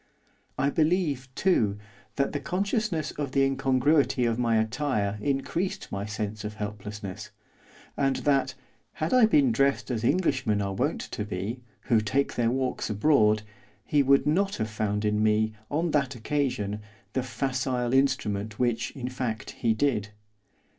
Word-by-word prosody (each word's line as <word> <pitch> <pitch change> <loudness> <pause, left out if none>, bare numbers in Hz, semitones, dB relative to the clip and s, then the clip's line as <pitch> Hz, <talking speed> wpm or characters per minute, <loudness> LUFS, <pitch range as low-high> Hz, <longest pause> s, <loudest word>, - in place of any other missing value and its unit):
I 140 - +1
believe, 155 -5 +1
too, 110 - +2 0.4
that 140 - +1
the 145 - -2
consciousness 185 -1 -1
of 145 -3 -4
the 135 - +4
incongruity 135 0 +2
of 115 0 0
my 115 -2 +2
attire 110 -3 0
increased 145 - -2
my 100 +1 -3
sense 105 0 -4
of 105 0 -5
helplessness, 105 -2 -6 0.7
and 135 -1 +1
that, 135 -2 +2 0.4
had 160 +5 -2
I 250 -3 +7
been 275 0 +4
dressed 140 - +1
as 115 -2 -2
Englishmen 130 - +1
are 100 -1 -2
wont - - -1
to - - -3
be, 105 +4 -4 0.2
who 115 -2 +2
take 135 +6 0
their 120 -1 +1
walks 130 +1 -1
abroad, 105 -2 +3 0.4
he 145 - +3
would 140 0 +4
not 195 +6 +2
have 110 -1 -3
found 105 -1 -1
in 105 0 +1
me, 110 0 +2 0.2
on 160 +3 0
that 140 -3 +1
occasion, 115 -5 -1 0.3
the 130 - +1
facile 125 -1 -1
instrument 110 -6 +1
which, 120 -2 0
in 125 -3 -4
fact, 125 -4 -4
he 115 -2 0
did. 110 -5 0
125 Hz, 150 wpm, -27 LUFS, 110-145 Hz, 0.7 s, I